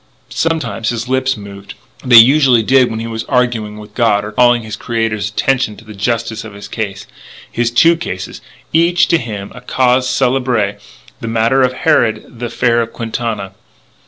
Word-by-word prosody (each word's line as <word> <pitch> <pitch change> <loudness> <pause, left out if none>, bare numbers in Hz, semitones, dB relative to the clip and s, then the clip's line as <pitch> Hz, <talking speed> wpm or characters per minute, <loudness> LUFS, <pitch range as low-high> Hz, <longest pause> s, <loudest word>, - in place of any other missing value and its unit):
Sometimes 160 -9 -2
his 115 0 -3
lips 130 0 0
moved. 100 -1 -11 0.3
They 125 -2 +4
usually 130 0 +6
did 130 +2 +4
when 110 -1 -4
he 115 - -4
was 115 -1 -4
arguing 120 -5 -1
with 105 0 -12
God 105 -3 +1
or 105 - -6
calling 120 +1 +3
his 110 -1 -6
Creator's 115 -2 -2
attention 125 -1 0
to 115 - -15
the 110 - -10
justice 115 +1 -2
of 110 -2 -10
his 100 - -9
case. 100 -4 -5 0.5
His 120 0 0
two 165 +8 +4
cases 95 - -6 0.3
each, 170 +2 +3
to 170 - +3
him, 105 -5 -6
a 125 - -11
cause 125 0 +1
célèbre; 125 -5 0 0.4
the 115 - -6
matter 115 +4 +2
of 130 -1 +2
Harrod; 115 -2 0
the 120 - -3
affair 120 0 +1
of 115 0 -4
Quintana. 115 -4 -4
115 Hz, 175 wpm, -15 LUFS, 110-125 Hz, 0.5 s, usually